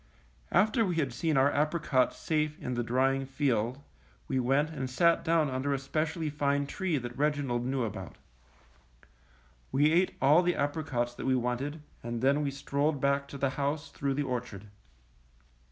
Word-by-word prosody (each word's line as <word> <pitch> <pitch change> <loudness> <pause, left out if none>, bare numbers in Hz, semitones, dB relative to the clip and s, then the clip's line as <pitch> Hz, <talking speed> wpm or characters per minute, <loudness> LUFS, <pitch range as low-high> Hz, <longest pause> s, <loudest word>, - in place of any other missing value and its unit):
After 215 +6 +3
we 180 -5 -1
had 140 -6 0
seen 155 +2 0
our 135 +2 +4
apricots 150 -3 +1
safe 155 -1 -1
in 125 -6 -4
the 120 - -1
drying 135 +3 +1
field, 130 -3 0 0.5
we 130 - 0
went 135 +5 +2
and 135 -5 -4
sat 170 +6 +3
down 165 -2 +2
under 135 +1 -1
a - - -1
specially 155 +4 -2
fine 140 -1 0
tree 175 +2 -1
that 120 -2 -5
Reginald 140 -4 0
knew 130 -1 0
about. 110 - -6 1.6
We 145 +3 +3
ate 180 +3 +2
all 145 +6 +5
the 175 -1 +1
apricots 145 -5 -1
that 120 - -6
we 130 - +3
wanted, 130 +5 -2 0.2
and 120 0 -4
then 140 +4 +3
we 145 - 0
strolled 140 +2 -1
back 140 +1 +1
to 140 - -8
the 140 -1 0
house 145 +1 -2
through 140 -1 -2
the 145 - 0
orchard. 120 -6 -4
140 Hz, 170 wpm, -30 LUFS, 130-155 Hz, 1.6 s, all